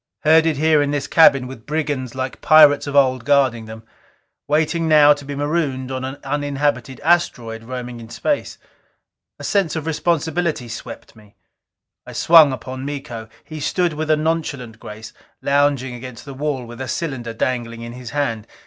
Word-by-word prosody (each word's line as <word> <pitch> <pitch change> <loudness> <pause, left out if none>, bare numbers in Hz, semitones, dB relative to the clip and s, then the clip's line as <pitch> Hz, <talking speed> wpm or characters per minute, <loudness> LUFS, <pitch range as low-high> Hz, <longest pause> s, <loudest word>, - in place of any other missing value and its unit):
Herded 160 -1 +4
here 155 0 +3
in 145 - 0
this 145 -1 -2
cabin, 140 -5 +5
with 125 -3 -10
brigands 145 -5 -2
like 130 0 -4
pirates 150 -2 +6
of 140 - -4
old, 130 -3 +3
guarding 135 -5 +2
them. 110 0 -10 0.6
Waiting 160 +2 +1
now 150 -2 +7
to 145 0 -10
be 140 +1 -6
marooned 145 -3 -2
on 130 0 -4
an 135 +2 -5
uninhabited 145 -1 -2
asteroid 125 -9 +1
roaming 125 -1 -6
in 115 -1 -11
space. 295 - -2 0.8
A - - -11
sense 195 -6 0
of 160 -2 -4
responsibility 160 -3 -1
swept 115 +1 -9
me. 105 -2 -19 0.7
I - - -11
swung 160 -4 +6
upon 130 0 -6
Miko. 130 -6 -6
He 155 -1 -8
stood 175 +3 0
with 155 +1 -4
a 155 - +4
nonchalant 150 -8 -3
grace, 110 +1 -10 0.3
lounging 140 -2 +1
against 120 0 -9
the 140 - -8
wall 135 -2 -3
with 120 +2 -10
a 130 - -4
cylinder 125 -5 -4
dangling 115 -1 -2
in 120 0 -7
his 125 -1 -9
hand. 115 -6 -2
140 Hz, 165 wpm, -20 LUFS, 125-155 Hz, 0.8 s, now